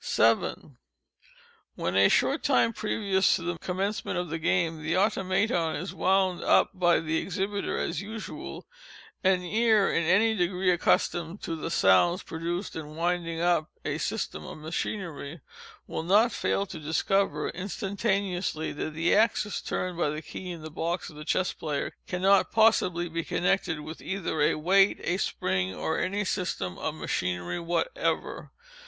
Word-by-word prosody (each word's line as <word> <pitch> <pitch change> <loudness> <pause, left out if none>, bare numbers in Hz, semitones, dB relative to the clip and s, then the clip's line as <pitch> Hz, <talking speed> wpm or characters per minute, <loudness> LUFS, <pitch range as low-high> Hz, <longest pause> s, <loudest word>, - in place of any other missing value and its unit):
7. 115 +4 +1 1.0
When, 90 - -2
a 100 0 +6
short 280 +4 +2
time 255 -4 +3
previous 200 -3 +1
to 170 - -4
the 175 -1 -3
commencement 195 +3 -2
of 175 -1 -2
the 165 +1 -3
game, 165 -2 0
the 160 +3 0
Automaton 190 -3 +1
is 180 +6 -5
wound 190 -1 +1
up - - +4
by 175 -2 +3
the 160 0 -1
exhibiter 200 +1 -2
as 155 - -2
usual, 215 +2 -7 0.6
an 185 -1 +3
ear 215 +2 +3
in 170 - +2
any 205 +6 +4
degree 180 -1 +1
accustomed 175 +1 0
to 165 - -3
the 160 - -4
sounds 165 - +4
produced 170 +4 -4
in 155 -1 -7
winding 170 0 -1
up 170 -3 +2 0.2
a - - -2
system 75 - -3
of - - -8
machinery, 160 -1 -4 0.5
will - - -4
not 205 +8 +4
fail 200 - 0
to 185 -4 -8
discover, 155 +1 0
instantaneously, 195 -3 -2
that 150 +1 -5
the 165 +2 +2
axis 210 -1 +2
turned 180 -2 -3
by 150 - +2
the 155 +2 -4
key 185 - -7
in 170 -3 -7
the 155 - -7
box 170 +3 -3
of - - -15
the 150 - -8
Chess 185 +4 0
Player, 150 -3 -3
cannot 190 +2 +3
possibly 200 -6 +3
be 165 0 -3
connected 180 -4 0
with 155 +2 -8
either 190 -5 -2
a 150 - +3
weight, 195 +6 +4
a 175 - 0
spring, 95 - -1
or 160 - -1
any 200 +2 -1
system 95 - -2
of - - -3
machinery 90 - -2
whatever. 175 - -2
175 Hz, 155 wpm, -28 LUFS, 160-195 Hz, 1.0 s, a